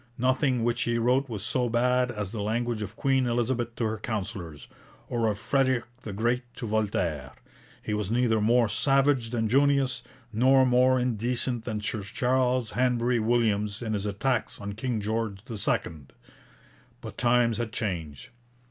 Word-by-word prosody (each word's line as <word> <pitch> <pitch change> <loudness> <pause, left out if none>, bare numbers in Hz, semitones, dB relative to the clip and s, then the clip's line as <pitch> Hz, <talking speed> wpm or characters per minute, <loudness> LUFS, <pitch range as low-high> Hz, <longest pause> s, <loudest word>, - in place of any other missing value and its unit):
Nothing 130 -1 +1
which 120 +1 0
he 120 -1 0
wrote 125 +4 +2
was 105 -4 -5
so 125 +1 0
bad 125 +2 +2
as 105 -5 -4
the 110 -2 -4
language 115 +2 -1
of 105 +1 -6
Queen 135 -1 +1
Elizabeth 120 0 -1
to - - -3
her 110 -1 -1
councillors, 95 - -5 0.4
or 115 -2 0
of 105 -2 0
Frederick 130 +1 +1 0.2
the 110 - -6
Great 120 +5 0
to 120 - -6
Voltaire. 90 - -1 0.5
He 105 - -3
was 105 -2 -2
neither 115 -2 +2
more 115 +2 +4
savage 135 +2 +2
than 115 -2 -1
Junius, 140 +1 +2 0.3
nor 130 +4 +5
more 125 +1 +4
indecent 120 0 -1
than 110 -3 -3
Sir 105 0 -3
Charles 125 +3 0
Hanbury 125 -1 +1
Williams 110 -2 +1
in 110 -2 -2
his 105 0 -2
attacks 115 +4 -1
on 100 0 -5
King 110 +1 -2
George 110 -2 -2
II. 80 - -2 0.9
But - - -9
times 120 -1 +3
had 115 -2 -3
changed. 85 -10 -4
115 Hz, 155 wpm, -27 LUFS, 105-125 Hz, 0.9 s, nor